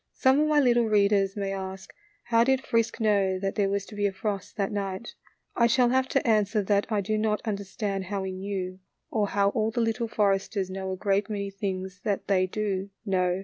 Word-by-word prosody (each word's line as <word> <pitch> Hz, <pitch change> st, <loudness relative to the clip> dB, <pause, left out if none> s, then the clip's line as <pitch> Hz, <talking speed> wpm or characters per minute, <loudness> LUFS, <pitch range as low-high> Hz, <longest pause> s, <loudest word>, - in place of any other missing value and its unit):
Some 265 Hz, +2 st, +3 dB
of 305 Hz, -, +3 dB
my 305 Hz, -1 st, +4 dB
little 240 Hz, -3 st, +4 dB
readers 200 Hz, -2 st, +3 dB
may 195 Hz, -1 st, -2 dB
ask, 190 Hz, 0 st, -6 dB, 0.3 s
How 230 Hz, -1 st, +3 dB
did 265 Hz, +1 st, +1 dB
Frisk 230 Hz, 0 st, 0 dB
know 200 Hz, -4 st, +2 dB
that 195 Hz, +1 st, -2 dB
there 200 Hz, -2 st, +1 dB
was 200 Hz, 0 st, -1 dB
to -, -, -13 dB
be 205 Hz, 0 st, +1 dB
a -, -, -2 dB
frost 195 Hz, +1 st, -4 dB
that 200 Hz, 0 st, 0 dB
night? 200 Hz, +1 st, -4 dB, 0.4 s
I 235 Hz, -, +4 dB
shall 245 Hz, +1 st, +3 dB
have 260 Hz, +1 st, +2 dB
to -, -, 0 dB
answer 215 Hz, -1 st, +2 dB
that 200 Hz, +1 st, +1 dB
I 210 Hz, -2 st, +2 dB
do 215 Hz, +2 st, -1 dB
not 215 Hz, -1 st, +1 dB
understand 200 Hz, -1 st, -3 dB
how 195 Hz, 0 st, -3 dB
he 190 Hz, -, -3 dB
knew, 185 Hz, -1 st, -4 dB, 0.3 s
or 210 Hz, -2 st, +1 dB
how 200 Hz, 0 st, +2 dB
all 215 Hz, +1 st, 0 dB
the 225 Hz, -, -3 dB
Little 230 Hz, 0 st, 0 dB
Foresters 195 Hz, -2 st, 0 dB
know 190 Hz, 0 st, -4 dB
a 185 Hz, -, -3 dB
great 200 Hz, +1 st, 0 dB
many 200 Hz, -2 st, -3 dB
things 190 Hz, -2 st, -4 dB
that 205 Hz, -2 st, -1 dB
they 185 Hz, -2 st, +3 dB
do 200 Hz, -1 st, -2 dB, 0.2 s
know. 185 Hz, -2 st, +1 dB
200 Hz, 215 wpm, -27 LUFS, 195-220 Hz, 0.4 s, my